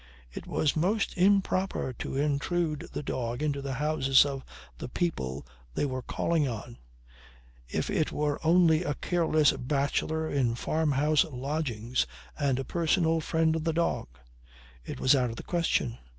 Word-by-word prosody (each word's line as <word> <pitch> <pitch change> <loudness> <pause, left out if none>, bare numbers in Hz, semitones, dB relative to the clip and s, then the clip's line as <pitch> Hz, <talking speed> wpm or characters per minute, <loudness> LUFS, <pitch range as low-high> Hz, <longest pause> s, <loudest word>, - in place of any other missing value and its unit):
It - - -8
was 150 - +1
most 195 +7 0
improper 190 -6 +2
to - - -4
intrude 150 +2 -1
the - - -4
dog 120 0 -3
into 145 -2 -1
the 135 -1 -4
houses 135 -1 +4
of 135 -2 -4 0.4
the - - -6
people 70 - -2 0.3
they - - +1
were 130 -2 -3
calling 160 +3 0
on 115 0 -6 0.9
if - - -1
it 155 - +1
were 150 -1 -1
only 165 -1 +5
a 145 -4 -2
careless 160 -4 +2
bachelor 145 +4 -1
in 130 -6 +1
farmhouse 150 +2 +2
lodgings 130 -4 -2 0.3
and 140 -4 +1
a 135 - -2
personal 165 0 +1
friend 160 0 +1
of 160 - -2
the 165 0 0
dog. 170 +1 0 0.8
It - - -7
was 130 - +5
out 125 -2 +1
of 115 - -6
the - - -8
question. 165 -8 0
150 Hz, 150 wpm, -29 LUFS, 130-160 Hz, 0.9 s, only